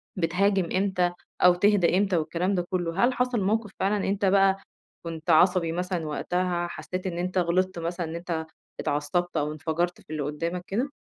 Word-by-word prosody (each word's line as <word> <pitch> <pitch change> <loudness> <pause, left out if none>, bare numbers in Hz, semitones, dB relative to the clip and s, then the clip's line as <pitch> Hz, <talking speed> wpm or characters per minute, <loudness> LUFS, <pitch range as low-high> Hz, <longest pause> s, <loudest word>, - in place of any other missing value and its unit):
بتهاجم 185 +1 +1
إمتى 185 -2 +1 0.3
أو 180 -1 +7
تهدا 185 -2 +3
إمتى 195 -3 +2
والكلام 175 +5 0
ده 175 -1 -1
كله، 175 +1 -1
هل 255 - +1
حصل 250 -3 0
موقِف 210 +1 0
فعلًا 200 +1 +1
أنت 200 +1 0
بقى 195 0 +4 0.5
كنت 165 0 -6
عصبي 170 +1 +4
مثلًا 180 -1 -2
وقتها، 175 +2 -1
حسيت 185 +2 -5
إن 170 -1 -4
أنت 185 +1 -2
غلطت 180 +1 +1
مثلًا 170 +1 -3
إن 160 +1 -6
أنت 170 -2 -3 0.3
اتعصبت، 155 +4 -1
أو 150 0 0
انفجرت 160 +3 -2
في - - -27
اللي 155 -2 -3
قدّامك 165 +5 -3
كده؟ 245 +8 -1
180 Hz, 175 wpm, -26 LUFS, 170-195 Hz, 0.5 s, أو